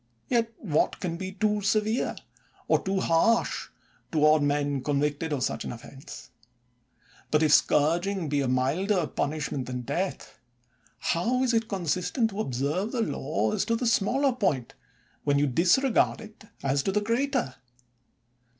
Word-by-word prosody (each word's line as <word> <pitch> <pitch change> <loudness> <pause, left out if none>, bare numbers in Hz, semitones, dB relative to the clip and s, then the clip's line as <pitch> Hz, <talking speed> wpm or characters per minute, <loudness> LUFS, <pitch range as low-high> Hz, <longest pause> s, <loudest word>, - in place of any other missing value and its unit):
Yet 230 -2 +1
what 155 -8 0
can 175 -3 -3
be 190 +2 -6
too 210 +1 0
severe, 215 +3 0 0.5
or - - +3
too 190 0 -1
harsh, 225 +8 +2 0.4
toward 155 -1 +4
men 145 -1 0
convicted 145 +2 -1
of 140 -4 -1
such - - -2
an - - -5
offense 135 +3 -11 0.8
1 - - -26
But 150 +1 +3
if 150 -1 +4
scourging 170 +4 +2
be 145 -1 0
a 135 - 0
milder 160 +9 +1
punishment 145 -3 -3
than 125 -1 -4
death, 145 0 -4 0.6
how 245 +10 0
is 250 -2 +1
it 225 -1 +1
con 195 -5 -4
sistent 180 - 0
to 200 0 -7
observe 145 - -2
the 240 - 0
law 110 - -1
as - - +1
to 230 - +1
the 245 - -2
smaller 255 +5 +2
point, 150 - -1 0.5
when 145 -1 +2
you 145 - +3
disregard 185 - +3
it 215 -1 -13 0.2
as 140 0 +1
to 195 - -1
the 210 +2 +1
greater? 240 - 0
170 Hz, 155 wpm, -27 LUFS, 145-215 Hz, 0.8 s, toward